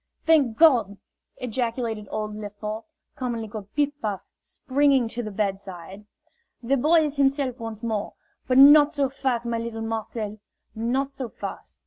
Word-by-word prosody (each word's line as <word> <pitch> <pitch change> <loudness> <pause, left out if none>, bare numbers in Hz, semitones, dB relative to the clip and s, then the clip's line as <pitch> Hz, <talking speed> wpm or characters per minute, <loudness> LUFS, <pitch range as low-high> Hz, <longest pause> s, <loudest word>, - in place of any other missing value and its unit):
"Thank 285 -9 +3
God!" 235 -11 +5 0.4
ejaculated 230 -3 -3
old 215 -1 -4
Lefort, 210 +1 -6 0.3
commonly 240 -4 -3
called 205 -1 -8
"Piff 290 -1 +2
Paff," 205 -3 -2 0.2
springing 275 -3 +1
to 240 - -4
the 215 - -5
bedside. 195 -2 -4 0.6
"The 265 +4 +2
boy 315 +5 +4
is 295 -2 -2
himself 270 -2 +1
once 225 -1 -7
more. 220 -3 -2 0.3
But 255 0 +2
not 290 +2 +8
so 280 -2 0
fast, 260 -3 -2
my 235 -1 -1
little 230 -1 -5
Marcel, 220 -1 -4 0.3
not 255 +5 -1
so 265 -3 -6
fast!" - - -8
235 Hz, 145 wpm, -25 LUFS, 215-270 Hz, 0.6 s, not